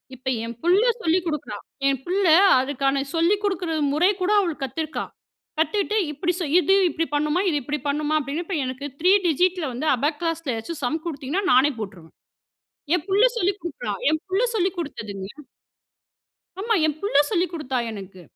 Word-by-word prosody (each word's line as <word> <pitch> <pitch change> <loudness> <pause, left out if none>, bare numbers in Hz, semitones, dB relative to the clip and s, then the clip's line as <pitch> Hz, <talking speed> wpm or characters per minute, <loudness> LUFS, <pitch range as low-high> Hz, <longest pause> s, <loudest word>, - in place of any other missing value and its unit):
இப்ப 260 +1 -13 0.2
என் 230 0 -5
புள்ள 365 +5 +4 0.2
சொல்லி 335 0 +2
குடுக்குறா. 300 -10 -3 0.3
என் 270 -2 +1
புள்ள 380 +4 0 0.3
அதுக்கான 275 +1 0
சொல்லி 335 +5 +3
குடுக்குற 375 -4 -1 0.2
முறை 340 +6 +4
கூட 365 +3 +1
அவ 345 -4 -1
கத்துருக்கா. 310 +4 -3 0.6
கத்துட்டு, 410 +5 +1
"இப்டி 340 +5 -1
செய் 310 -5 -2
இது 380 +2 +3 0.2
இப்டி 330 0 -1
பண்ணுமா. 300 +4 +1
இது 300 - 0
இப்டி 295 +4 -3
பண்ணுமா" 295 +1 -1
அப்டீன்னு 290 +4 -3
இப்ப 380 - -3
எனக்கு 260 +2 -5 0.2
3 365 +3 +5
டிஜிட்‌ல 355 +1 +2
வந்து 295 +6 -3
அபாக்ளாஸ்ல 310 +3 -2
ஏதாவது 225 +10 -5
சம் 305 +6 0
குடுத்தீங்கன்னா, 310 +4 -3
நானே 265 +4 +5
போட்ருவேன். 190 -6 -8 0.8
என் 355 - 0
புள்ள 400 +5 +4
சொல்லி 390 -2 +2
குடுக்குறா. 350 +9 -5 0.2
என் 315 - 0
புள்ள 380 +4 +1
சொல்லி 380 -3 +2
குடுத்ததுங்க. 205 - -5 1.3
ஆமா. 450 +2 +1
என் 300 - -1
புள்ள 400 -8 -1
சொல்லிக் 360 -3 0
குடுத்தா 275 -6 -3
எனக்கு. 195 -3 -9
315 Hz, 160 wpm, -23 LUFS, 275-360 Hz, 1.3 s, 3